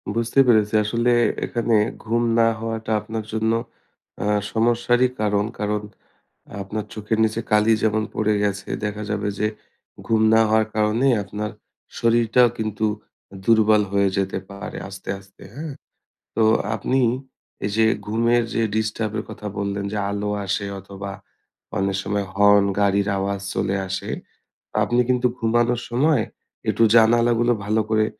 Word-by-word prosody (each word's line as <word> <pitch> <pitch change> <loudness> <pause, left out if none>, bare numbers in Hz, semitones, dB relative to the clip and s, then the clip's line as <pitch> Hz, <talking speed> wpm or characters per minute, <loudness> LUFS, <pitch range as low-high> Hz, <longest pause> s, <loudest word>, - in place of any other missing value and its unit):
বুঝতে 115 +3 +1
পেরেছি 110 -2 +4
আসলে 115 +3 +1 0.3
এখানে 115 -1 0 0.3
ঘুম 115 +2 +1 0.2
না 115 - +5
হওয়াটা 110 0 -4
আপনার 110 0 -5
জন্য 110 0 +1 0.7
আ - - -2 0.3
সমস্যারই 120 +2 +3
কারণ। 105 -1 +1
কারণ 105 0 -1 0.8
আপনার 105 +2 -4
চোখের 110 +1 -2
নিচে 110 +1 0
কালি 105 +1 +4
যেমন 110 0 +2
পড়ে 110 0 +1
গেছে 100 -1 -2 0.2
দেখা 105 0 -3
যাবে 105 0 -1
যে, 105 - +2 0.6
ঘুম 110 -1 +2
না 110 - +6
হওয়ার 110 0 +3
কারণেই 110 +5 +2
আপনার 105 +2 -5 0.5
শরীরটাও 120 +1 +4
কিন্তু 110 0 -1 0.6
দুর্বল 110 -2 +5
হয়ে 100 -1 +3
যেতে 95 0 -1
পারে 100 -1 -7
আস্তে, 95 -1 -10
আস্তে, 95 0 -18
হ্যাঁ? 150 -1 -6 0.6
তো 115 - +3 0.3
আপনি 130 +5 0 0.7
এইযে 110 +2 +2 0.2
ঘুমের 115 +2 +2
যে 115 - +1
ডিস্টার্বের 110 0 -1
কথা 105 - -8
বললেন 100 0 -2
যে 105 - -2
আলো 105 0 -2 0.2
আসে 100 +1 -1
অথবা 100 0 -8 0.7
অনেক 95 0 0
সময় 100 0 -2
হর্ন, 100 0 +5 0.2
গাড়ির 100 0 +2
আওয়াজ 100 0 -2
চলে 95 - 0
আসে। 95 - -4 0.7
আপনি 120 +1 +2
কিন্তু 125 0 +2
ঘুমানোর 120 +1 +1
সময় 135 0 +3 0.5
একটু - - 0
জানালাগুলো 120 +1 +4
ভালো 110 +1 +2
করে 110 -1 +3
110 Hz, 135 wpm, -22 LUFS, 105-115 Hz, 0.8 s, না